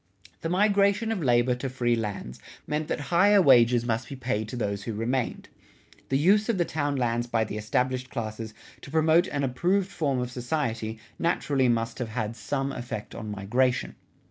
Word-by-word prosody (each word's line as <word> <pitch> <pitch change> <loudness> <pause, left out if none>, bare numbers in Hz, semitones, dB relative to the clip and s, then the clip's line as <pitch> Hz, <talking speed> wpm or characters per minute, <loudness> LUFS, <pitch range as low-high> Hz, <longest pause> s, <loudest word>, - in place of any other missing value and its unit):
The 165 - -2
migration 200 +3 +3
of 210 -5 -2
labor 120 -2 +3
to 125 +2 -4
free 120 -2 +1
lands 100 - -5 0.3
meant 150 +1 -2
that - - -2
higher 200 +4 +6
wages 120 -6 +5
must 115 0 -1
be 140 - -6
paid 120 -4 -2
to - - -5
those 100 -4 -2
who 115 - -3
remained. 120 +3 -2 0.6
The 135 - +2
use 205 - +3
of 225 - +2
the 175 - +2
town 145 -3 -1
lands 120 -2 0
by 115 -2 +1
the 105 - -5
established 125 +4 -1
classes 110 -3 -5 0.3
to - - -10
promote 160 +3 +3
an 140 -1 -2
approved 180 +9 +1
form 140 -7 -1
of 125 0 -2
society 120 -4 -2 0.2
naturally 140 -6 +1
must 115 0 -1
have 120 -3 -3
had 110 0 -3
some 135 +5 -2
effect 120 -4 -6
on 110 -2 -6
migration. 120 +6 0
125 Hz, 180 wpm, -27 LUFS, 115-155 Hz, 0.6 s, higher